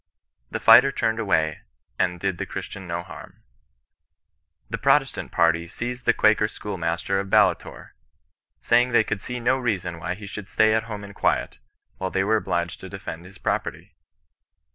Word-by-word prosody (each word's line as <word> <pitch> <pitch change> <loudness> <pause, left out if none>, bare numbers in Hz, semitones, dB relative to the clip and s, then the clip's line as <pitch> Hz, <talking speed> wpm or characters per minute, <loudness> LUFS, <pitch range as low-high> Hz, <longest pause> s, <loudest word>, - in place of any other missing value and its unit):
The - - -3
fighter 135 - +7
turned 110 -3 -1
away 80 -8 +1 0.4
and 90 -1 0
did 95 -1 -2
the - - -3
Christian 95 -2 -7
no 85 0 -3
harm. - - -12 1.2
The - - -4
Protestant - - +2
party 85 0 +2
seized 120 +6 -5
the - - +7
Quaker 110 0 +3
schoolmaster 95 -2 -2
of 100 0 -4
Ballitore, - - +1 0.7
saying 120 +1 +3
they 115 - +5
could 105 -2 -3
see 125 0 -5
no 125 +2 +2
reason 90 -8 -2
why 85 +2 -3
he 105 +2 -10
should 100 0 -8
stay 110 0 +3
at 110 +1 +1
home 105 -3 -6
in 100 0 -10
quiet, - - 0 0.4
while 95 - -2
they 95 0 0
were 110 +3 +3
ohliged 85 -2 -2
to 95 - -9
defend 90 -3 -7
his 95 +1 -14
property. 90 +3 -3
100 Hz, 165 wpm, -24 LUFS, 85-110 Hz, 1.2 s, fighter